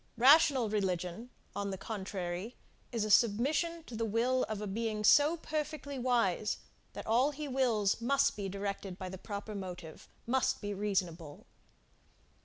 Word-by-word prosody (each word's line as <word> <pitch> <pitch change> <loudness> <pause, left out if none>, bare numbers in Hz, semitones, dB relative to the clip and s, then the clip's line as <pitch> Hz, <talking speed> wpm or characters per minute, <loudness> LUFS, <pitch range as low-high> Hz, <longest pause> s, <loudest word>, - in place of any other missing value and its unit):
Rational 275 -1 +6
religion, 190 +1 -2 0.3
on 200 0 -2
the 190 - -4
contrary, 190 0 -5 0.4
is 230 -3 -1
a 215 - -1
submission 280 - +2
to 245 - -9
the 230 - -2
will 235 +4 +1
of 215 -2 -3
a 210 - -4
being 215 +1 -2
so 295 +8 +6
perfectly 300 -3 -4
wise, 230 -5 +1 0.4
that - - -7
all 245 +6 +3
he 300 0 -5
wills 235 -6 +1
must 275 +4 +2
be 200 -2 -4
directed 200 -1 -4
by 185 -1 -5
the 190 0 -8
proper 205 +1 -6
motive 180 -5 -8 0.2
must 260 +2 +1
be 205 -1 -4
reasonable. 180 -7 -3
215 Hz, 150 wpm, -32 LUFS, 195-255 Hz, 0.4 s, Rational